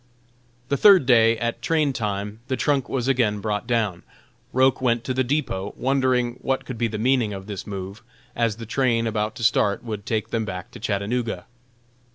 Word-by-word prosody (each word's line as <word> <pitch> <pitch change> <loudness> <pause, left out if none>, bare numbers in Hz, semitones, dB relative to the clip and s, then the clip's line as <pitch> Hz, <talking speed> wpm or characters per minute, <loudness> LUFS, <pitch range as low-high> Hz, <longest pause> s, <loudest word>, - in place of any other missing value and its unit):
The 140 - +1
third 195 -6 +7
day, 115 -2 +5
at 115 0 -3
train 155 -4 +1
time, 105 -2 -3
the 130 - -1
trunk 140 -4 +1
was 130 -2 -1
again 115 -6 +2
brought 105 +2 -2
down. 110 -7 0 0.5
Roch 130 +1 +3
went 120 -2 +1
to 130 - -2
the 130 +1 +1
depot, 120 -8 -2
wondering 130 -2 +1
what 135 0 -1
could 125 -3 -6
be 120 - +2
the 110 -1 -4
meaning 120 -2 +1
of 95 -1 -7
this 100 -2 -6
move, 100 +1 -6 0.3
as 115 -3 +1
the 115 0 -8
train 115 -1 +1
about 110 -1 -1
to - - -6
start 105 0 +2
would 105 -3 -6
take 110 -2 -1
them 115 -1 0
back 90 -3 -6
to - - -11
Chattanooga. 105 -1 -2
115 Hz, 190 wpm, -23 LUFS, 105-130 Hz, 0.5 s, third